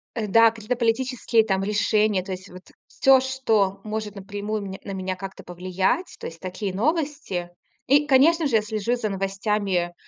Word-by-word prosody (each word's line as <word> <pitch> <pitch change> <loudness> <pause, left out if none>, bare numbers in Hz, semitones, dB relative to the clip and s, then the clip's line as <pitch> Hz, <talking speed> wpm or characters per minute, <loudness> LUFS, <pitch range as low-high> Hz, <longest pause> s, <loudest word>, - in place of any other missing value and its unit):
Э, 220 -3 -2
да, 230 +3 +6
какие-то 225 +2 -3
политические 235 -1 +1
там 195 -3 0
решения, 210 -1 +1
то 190 - -8
есть 185 +1 -7
вот 180 +1 -14 0.2
всё, 270 -1 +5
что 220 -7 0
может 215 -1 -4
напрямую 205 +2 -4
меня 195 -1 -7
на 200 - -5
меня 185 -1 -3
как-то 195 0 -8
повлиять, 185 - -1
то - - -8
есть 165 0 -10
такие 185 +1 -4
новости. 280 - -1 0.4
И, 290 +2 +4
конечно 300 +4 +4
же, 235 - 0
я 215 - +5
слежу 215 +2 -1
за 225 -3 -2
новостями 195 -2 -1
210 Hz, 175 wpm, -24 LUFS, 190-240 Hz, 0.4 s, да